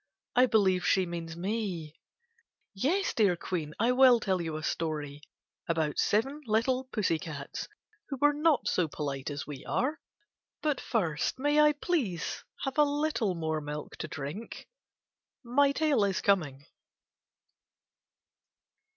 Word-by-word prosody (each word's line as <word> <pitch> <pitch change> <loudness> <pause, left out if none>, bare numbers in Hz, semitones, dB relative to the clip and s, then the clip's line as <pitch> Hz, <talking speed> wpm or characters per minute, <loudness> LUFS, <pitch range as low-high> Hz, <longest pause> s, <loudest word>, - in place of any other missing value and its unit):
I 250 +1 +6
believe 190 -6 +3
she 190 0 +3
means 170 -1 -6
me. 180 -5 -3 0.7
Yes, 320 - 0
dear 200 -6 +3
Queen, 165 -3 -4
I 230 +3 +3
will 250 -1 +6
tell 190 -4 0
you 160 -2 -3
a 155 - -7
story 150 -3 -3 0.5
about 160 -3 0
seven 270 +8 +1
little 250 +4 +1
pussy 205 -10 0
cats 150 -5 -6 0.4
who 275 - -3
were 290 +1 +5
not 300 0 +2
so 180 -3 +2
polite 140 -2 -4
as 145 -1 -5
we 145 -3 -8
are. 290 +5 -1 0.6
But 300 -4 0
first 170 - -1
may 290 +3 +2
I 300 0 +6
please 280 - -2 0.2
have 270 +2 -2
a - - +8
little 290 -9 0
more 160 -2 -2
milk 150 0 -6
to - - -4
drink? 155 +10 -7 0.8
(My 275 +4 +3
tale 290 -6 +2
is 195 -2 0
coming.) 145 -9 +1
195 Hz, 135 wpm, -30 LUFS, 160-265 Hz, 0.8 s, a